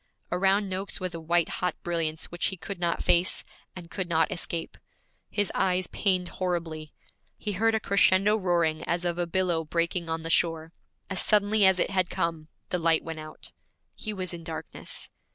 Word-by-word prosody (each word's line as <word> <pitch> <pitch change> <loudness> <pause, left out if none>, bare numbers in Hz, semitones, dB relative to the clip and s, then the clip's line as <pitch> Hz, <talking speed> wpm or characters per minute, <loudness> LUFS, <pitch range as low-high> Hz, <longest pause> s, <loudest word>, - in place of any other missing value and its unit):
Around 195 +3 +2
Noakes 190 +1 -1
was 185 -2 -3
a 165 - -5
white 170 +1 +2
hot 180 -2 0
brilliance 165 -2 -1
which 175 0 -1
he 190 - -4
could 185 +2 -7
not 170 -1 0
face, 175 +1 +3 0.3
and 175 -2 -10
could 185 -3 -3
not 160 -1 +2
escape. 170 -2 -2 0.5
His 205 -1 +1
eyes 185 -1 +2
pained 185 -3 0
horribly. 165 -4 -3 0.5
He 210 - -3
heard 225 +3 +2
a - - +2
crescendo 200 0 +4
roaring 170 -6 +1
as 175 +1 -1
of 175 0 -1
a 175 - 0
billow 175 -2 +1
breaking 170 +1 -1
on 160 0 -2
the 165 - -2
shore; 165 -1 +1 0.4
as 190 - +1
suddenly 210 -1 +5
as 190 -1 +5
it - - +1
had 185 -2 +1
come, 165 -2 -2 0.2
the 180 - 0
light 165 -1 +3
went 165 -1 -6
out. 155 0 -8 0.4
He 215 - -5
was 185 -3 -2
in 170 -1 -7
darkness. 160 -1 -6
175 Hz, 185 wpm, -27 LUFS, 165-190 Hz, 0.5 s, suddenly